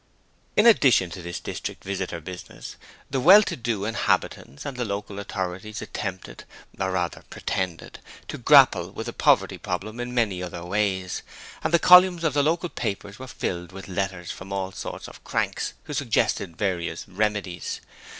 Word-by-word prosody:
In 210 Hz, -, +6 dB
addition 125 Hz, -, +5 dB
to 90 Hz, -, -7 dB
this 85 Hz, 0 st, -5 dB
district -, -, -6 dB
visitor 95 Hz, -3 st, -3 dB
business, 90 Hz, +3 st, -9 dB, 0.4 s
the 135 Hz, -, +1 dB
well 190 Hz, +10 st, +8 dB
to -, -, -3 dB
do 115 Hz, -4 st, -2 dB
inhabitants 105 Hz, -9 st, -1 dB
and 140 Hz, -, -4 dB
the 125 Hz, -, -2 dB
local 100 Hz, -1 st, -4 dB
authorities 95 Hz, +2 st, -4 dB
attempted 100 Hz, -3 st, -6 dB, 0.4 s
or 95 Hz, -1 st, 0 dB
rather, 90 Hz, -2 st, -2 dB
pretended 90 Hz, -3 st, -4 dB, 0.3 s
to -, -, -6 dB
grapple -, -, +6 dB
with -, -, -6 dB
the -, -, -5 dB
poverty -, -, +3 dB
'problem' 105 Hz, +6 st, -4 dB
in 120 Hz, 0 st, -4 dB
many 110 Hz, -7 st, 0 dB
other 85 Hz, -1 st, -6 dB
ways, 95 Hz, -1 st, -1 dB, 0.4 s
and -, -, 0 dB
the 170 Hz, -, +6 dB
columns 180 Hz, 0 st, +7 dB
of 160 Hz, -4 st, +1 dB
the 145 Hz, -, +3 dB
local 165 Hz, +4 st, +1 dB
papers 100 Hz, -5 st, -4 dB
were 130 Hz, -, -8 dB
filled 90 Hz, -7 st, -4 dB
with 95 Hz, +1 st, -9 dB
letters 95 Hz, -2 st, -3 dB
from 95 Hz, +1 st, -9 dB
all 95 Hz, -1 st, -2 dB
sorts -, -, -6 dB
of -, -, -13 dB
cranks -, -, -1 dB
who 150 Hz, -, -7 dB
suggested 110 Hz, -, 0 dB
various 85 Hz, -5 st, -2 dB
remedies. 100 Hz, -3 st, -2 dB
100 Hz, 165 wpm, -25 LUFS, 90-125 Hz, 0.4 s, well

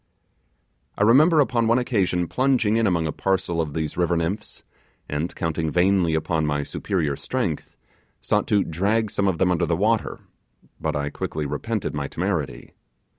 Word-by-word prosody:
I -, -, +2 dB
remember 150 Hz, +9 st, +6 dB
upon 120 Hz, -5 st, +2 dB
one 115 Hz, +2 st, +4 dB
occasion 95 Hz, -8 st, 0 dB
plunging 125 Hz, -4 st, +2 dB
in 115 Hz, -1 st, +2 dB
among 85 Hz, -4 st, +1 dB
a 80 Hz, -, -1 dB
parcel 90 Hz, -3 st, -1 dB
of 75 Hz, -3 st, -4 dB
these 80 Hz, -2 st, -3 dB
river 85 Hz, -1 st, +1 dB
nymphs, 85 Hz, +6 st, -4 dB, 0.4 s
and 75 Hz, +4 st, -3 dB
counting 80 Hz, -2 st, -1 dB
vainly 90 Hz, -1 st, +2 dB
on 80 Hz, 0 st, -1 dB
my 75 Hz, -1 st, 0 dB
superior 80 Hz, -4 st, -2 dB
strength, -, -, -3 dB, 0.4 s
sought -, -, 0 dB
to 100 Hz, -1 st, +3 dB
drag 100 Hz, +6 st, 0 dB
some 100 Hz, -, 0 dB
of 95 Hz, -3 st, +1 dB
them 90 Hz, +2 st, +2 dB
under 85 Hz, -1 st, +1 dB
the 85 Hz, -, +1 dB
water, 110 Hz, +3 st, 0 dB, 0.6 s
but -, -, -2 dB
I 70 Hz, 0 st, -2 dB
quickly 75 Hz, -1 st, -4 dB
repented 70 Hz, -, -3 dB
my 70 Hz, -1 st, -3 dB
temerity. 90 Hz, -4 st, -3 dB
90 Hz, 165 wpm, -23 LUFS, 80-105 Hz, 0.6 s, remember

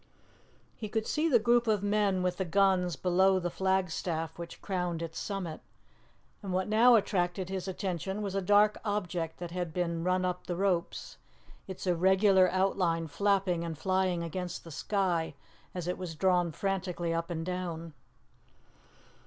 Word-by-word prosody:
He 215 Hz, -, -6 dB
could 220 Hz, +1 st, -1 dB
see 315 Hz, +2 st, +1 dB
the 255 Hz, -, +6 dB
group 235 Hz, +1 st, +3 dB
of 210 Hz, -2 st, +2 dB
men 205 Hz, -2 st, +1 dB
with 180 Hz, -1 st, 0 dB
the 190 Hz, -, 0 dB
guns 185 Hz, -1 st, +2 dB
below 190 Hz, +4 st, +3 dB
the 175 Hz, -1 st, -2 dB
flagstaff 175 Hz, -4 st, -1 dB
which 170 Hz, 0 st, -8 dB
crowned 180 Hz, -4 st, -2 dB
its 165 Hz, -1 st, -5 dB
summit, 185 Hz, -6 st, -4 dB, 0.8 s
and 195 Hz, -3 st, -5 dB
what 185 Hz, +1 st, 0 dB
now 230 Hz, +3 st, +6 dB
attracted 185 Hz, -3 st, 0 dB
his 190 Hz, -1 st, -4 dB
attention 190 Hz, +1 st, -3 dB
was 200 Hz, -2 st, -3 dB
a 195 Hz, -, 0 dB
dark 205 Hz, +2 st, +4 dB
object 180 Hz, -6 st, -2 dB
that 175 Hz, -1 st, -6 dB
had 175 Hz, -3 st, -4 dB
been 170 Hz, -2 st, -1 dB
run 185 Hz, +1 st, +1 dB
up 180 Hz, 0 st, -3 dB
the 175 Hz, -, -2 dB
ropes, 180 Hz, -2 st, -1 dB, 0.5 s
its 190 Hz, 0 st, -7 dB
irregular 190 Hz, +1 st, +4 dB
outline 185 Hz, -3 st, +1 dB
flapping 190 Hz, -1 st, +1 dB
and 165 Hz, -2 st, -5 dB
flying 185 Hz, 0 st, 0 dB
against 180 Hz, +1 st, -5 dB
the 165 Hz, -, -11 dB
sky 170 Hz, -2 st, -1 dB, 0.4 s
as 175 Hz, -2 st, -4 dB
it 180 Hz, -, -2 dB
was 175 Hz, -3 st, -5 dB
drawn 180 Hz, 0 st, +2 dB
frantically 180 Hz, -1 st, -2 dB
up 165 Hz, +1 st, -2 dB
and 165 Hz, -1 st, -3 dB
down. 170 Hz, -3 st, -4 dB
185 Hz, 160 wpm, -30 LUFS, 170-195 Hz, 0.8 s, the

